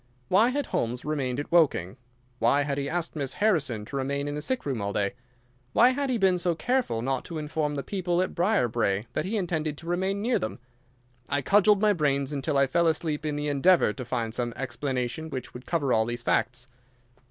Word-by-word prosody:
Why 210 +6 +5
had 285 +1 -1
Holmes 120 - -2
remained 140 -4 -1
at 145 - -5
Woking? 140 - +3 0.4
Why 140 +5 +3
had 140 0 -2
he 140 0 -2
asked 170 0 -3
Miss 140 -3 -3
Harrison 145 - +1
to 140 - -8
remain 140 +1 -1
in 145 - -3
the 150 - -4
sick 260 - -2
room 130 -6 -2
all 100 0 -2
day? 100 +2 -1 0.6
Why 245 - +6
had 275 +1 -1
he 250 - +1
been 190 -3 +3
so 175 -1 +1
careful 245 - 0
not 135 0 -1
to 165 - -6
inform 150 -1 -2
the 140 - -3
people 180 -3 -1
at 185 - 0
Briarbrae 120 - +1
that - - -1
he 215 +4 -1
intended 160 -6 -2
to 165 - -9
remain 190 +3 -1
near 235 +4 +1
them? 110 - -4 0.7
I 140 -1 0
cudgelled 205 +4 +4
my 210 -1 +4
brains 140 -4 0
until 140 +1 -1
I 140 - +5
fell 170 +6 +2
asleep 155 -1 -1
in 150 - -1
the 145 0 -2
endeavour 145 -3 +4
to 125 - -6
find 115 -2 -3
some 120 0 -2
explanation 130 +3 -3
which 130 -4 -6
would 125 +1 -10
cover 145 -7 +1
all 110 0 +3
these 120 +1 -4
facts. 120 0 0
145 Hz, 210 wpm, -27 LUFS, 125-180 Hz, 0.7 s, Why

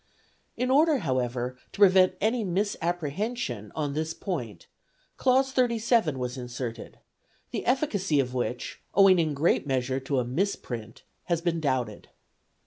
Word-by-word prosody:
In 250 +1 0
order, 305 +2 +5
however, 125 - -2 0.2
to - - -11
prevent 185 -2 +6
any 225 +3 +1
misapprehension 175 - -2
on 145 -3 -2
this 160 +2 -2
point 125 - -5 0.5
clause 265 +1 +2
37 235 - +2
was 125 +1 -4
inserted, 125 -2 -6 0.5
the - - -3
efficacy 205 - +1
of 125 -2 0
which, 125 -1 -3
owing 195 -2 +7
in 155 -3 0
great 150 0 +2
measure 130 0 0
to 135 +1 -2
a 125 - +1
misprint, 120 - -3 0.2
has 170 -2 0
been 170 -1 -1
doubted. 130 -8 -2
160 Hz, 135 wpm, -27 LUFS, 125-205 Hz, 0.5 s, owing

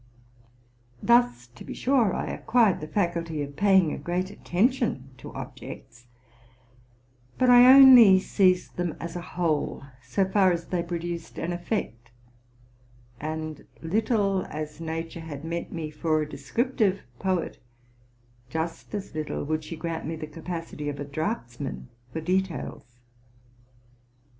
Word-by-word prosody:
Thus, 235 - +3
to 120 - -13
be - - -7
sure, 250 -7 +2
I - - -2
acquired 225 -9 +2
the 155 - -5
faculty 170 -5 -1
of 140 0 -8
paying 190 -3 +4
a - - -5
great 180 +2 -2
attention 205 - 0
to - - -9
objects; 120 +1 -9 1.3
but 255 -1 +4
I 245 +1 +9
only 255 -8 +9
seized 185 -1 +1
them 175 -2 -2
as 170 0 -6
a 175 - -4
whole, 170 -6 -2 0.2
so 160 +11 0
far 190 -1 +4
as 170 -1 -2
they 180 -2 -1
preduced 170 -1 -5
an 170 +1 -2
effect: 175 - -4 1.1
and, 155 0 -5 0.2
little 195 +1 +1
as 155 +1 -6
Nature 165 +1 -4
had 155 -2 -8
meant 170 +1 -4
me 160 -2 -5
for 155 0 0
a 150 - -2
descriptive 205 - 0 0.2
poet, 185 -3 -1 0.9
just 165 +6 -4
as 200 -5 -6
little 155 -1 -3
would 155 +1 -2
she 160 +2 -7
grant 165 -1 -4
me 165 - -3
the 155 -1 -6
capacity 165 -1 -6
of 140 - -6
a 145 - -4
draughtsman 140 - -4 0.2
for 160 - -4
details. 170 -8 -3
170 Hz, 135 wpm, -26 LUFS, 155-195 Hz, 1.3 s, I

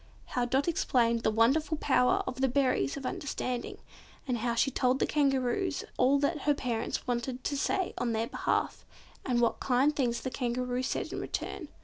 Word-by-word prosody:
How 245 -1 +1
Dot 265 +5 +1
explained 235 -8 +2
the - - +2
wonderful 270 +9 +2
power 260 -4 +2
of 255 0 -5
the 265 - +4
berries 255 - +1
of 270 - -6
understanding, 255 -3 -3 0.5
and 245 -3 0
how 235 +1 -1
she 270 +3 +2
told 255 +1 +2
the - - +1
Kangaroos 280 +3 +1
all 265 +3 +4
that 300 +2 +1
her 295 +1 +2
parents 240 -4 -2
wanted 245 +1 -1
her 255 - -12
to 285 - -1
say 365 +6 0
on 240 - 0
their 225 0 0
behalf, - - -1 0.4
and 245 -2 +1
what 235 -1 +1
kind 270 +4 +2
things 240 -4 0
the 260 - -4
Kangaroo 250 0 -1
said 255 - -2
in - - -3
return. - - -4
255 Hz, 190 wpm, -30 LUFS, 240-280 Hz, 0.5 s, the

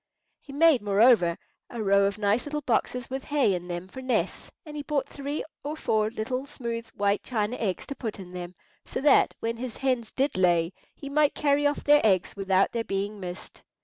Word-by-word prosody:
He 280 - -13
made, 295 -2 +5
moreover, 205 -4 +4 0.3
a 235 -2 -4
row 200 0 +4
of 200 +1 -1
nice 210 +2 +1
little 295 0 -3
boxes 250 -1 0
with 265 +1 -5
hay 285 -9 +2
in 180 -1 -4
them 175 +1 -5
for 260 +7 -9
nests, 255 -1 -1 0.2
and 300 -1 -9
he 295 - -3
bought 285 -1 -1
three 285 +2 -4 0.2
or 300 +2 -4
four 215 -6 +1
little 250 +4 -3
smooth 235 -4 -5
white 200 0 +1
china 220 -1 -2
eggs 195 -5 -2
to 280 - -6
put 225 -6 -5
in 180 -2 -9
them, 180 0 -7 0.3
so - - -5
that, 290 - +4
when 230 0 -2
his 245 -1 -6
hens 255 -4 0
did 270 -7 0
lay, 175 -1 +3 0.2
he 280 - -9
might 295 +1 +2
carry 290 0 +2
off 290 - -2
their 295 0 +6
eggs 190 -4 +2
without 195 -1 +2
their 230 -1 -2
being 200 0 -3
missed. 180 -1 -8
230 Hz, 205 wpm, -27 LUFS, 195-280 Hz, 0.3 s, their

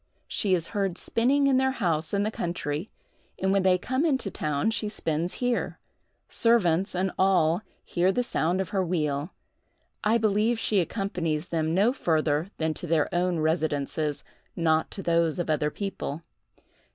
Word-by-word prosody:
She 195 -3 +2
is 170 -2 -3
heard 195 -4 -1
spinning 270 +8 +2
in 270 -2 +4
their 265 0 +2
house 165 -8 -1
in 200 0 +1
the 215 - -1
country, 170 -2 -3 0.5
and 190 0 0
when 195 0 +3
they 185 -1 +4
come 260 - -1
into 265 - 0
town 150 +6 0
she 215 -1 -2
spins 165 -4 -2
here; 245 -1 -1 0.5
servants 195 -6 +2
and 185 +1 0
all 180 -2 +3 0.2
hear 180 +2 +2
the 245 +5 0
sound 175 -5 0
of 185 - -4
her 195 -2 0
wheel. 150 -3 -1 0.7
I 220 +2 +3
believe 215 +1 +2
she 215 -2 +1
accompanies 175 -4 -2
them 160 0 0
no 210 +6 +4
further 155 - 0
than 160 -1 0
to 175 - -7
their 160 -2 +1
own 175 -1 +1
residences, 155 -2 -1 0.3
not 160 -2 +2
to 195 - -7
those 170 -2 +2
of 175 -3 -1
other 150 -1 +1
people. 165 -4 -5
180 Hz, 165 wpm, -27 LUFS, 160-210 Hz, 0.7 s, in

